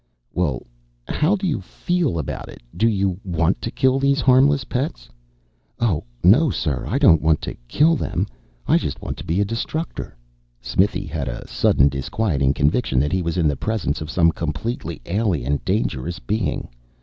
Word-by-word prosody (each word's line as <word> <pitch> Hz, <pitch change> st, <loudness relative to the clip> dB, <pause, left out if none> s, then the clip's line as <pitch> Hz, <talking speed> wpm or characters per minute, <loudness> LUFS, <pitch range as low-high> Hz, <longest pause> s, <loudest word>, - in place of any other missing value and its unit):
"Well, 80 Hz, -8 st, -1 dB, 0.4 s
how 160 Hz, +7 st, +2 dB
do 195 Hz, 0 st, -3 dB
you 150 Hz, -, 0 dB
feel 165 Hz, -, -1 dB
about 75 Hz, -, -4 dB
it? -, -, -12 dB
Do 115 Hz, -, +3 dB
you 100 Hz, -4 st, 0 dB
want 85 Hz, -2 st, 0 dB
to -, -, -3 dB
kill 130 Hz, +2 st, +2 dB
these 140 Hz, +1 st, +2 dB
harmless 135 Hz, +1 st, +4 dB
pets?" 125 Hz, -, -3 dB, 0.7 s
"Oh, 105 Hz, -10 st, +1 dB, 0.2 s
no, 130 Hz, -, +6 dB
sir. 75 Hz, -, -2 dB
I -, -, 0 dB
don't 80 Hz, -2 st, +6 dB
want 80 Hz, -1 st, +3 dB
to -, -, -4 dB
kill 155 Hz, -, +4 dB
them. -, -, -1 dB, 0.4 s
I -, -, +4 dB
just -, -, -4 dB
want -, -, -5 dB
to -, -, -7 dB
be 85 Hz, +5 st, 0 dB
a -, -, +2 dB
Destructor." 115 Hz, -, -4 dB, 0.4 s
Smithy 100 Hz, +2 st, 0 dB
had 75 Hz, -4 st, -4 dB
a -, -, -5 dB
sudden, 70 Hz, -, +3 dB
disquieting 70 Hz, 0 st, 0 dB
conviction 70 Hz, -, +1 dB
that 75 Hz, +2 st, +1 dB
he 95 Hz, -, +1 dB
was 85 Hz, 0 st, -2 dB
in 85 Hz, -3 st, +3 dB
the 75 Hz, -, +1 dB
presence 100 Hz, -4 st, -2 dB
of 80 Hz, -, -5 dB
some 85 Hz, 0 st, +3 dB
completely 85 Hz, -, -4 dB
alien, 85 Hz, -, 0 dB
dangerous 65 Hz, +8 st, -1 dB
being. 105 Hz, +6 st, -2 dB
90 Hz, 175 wpm, -22 LUFS, 75-120 Hz, 0.7 s, no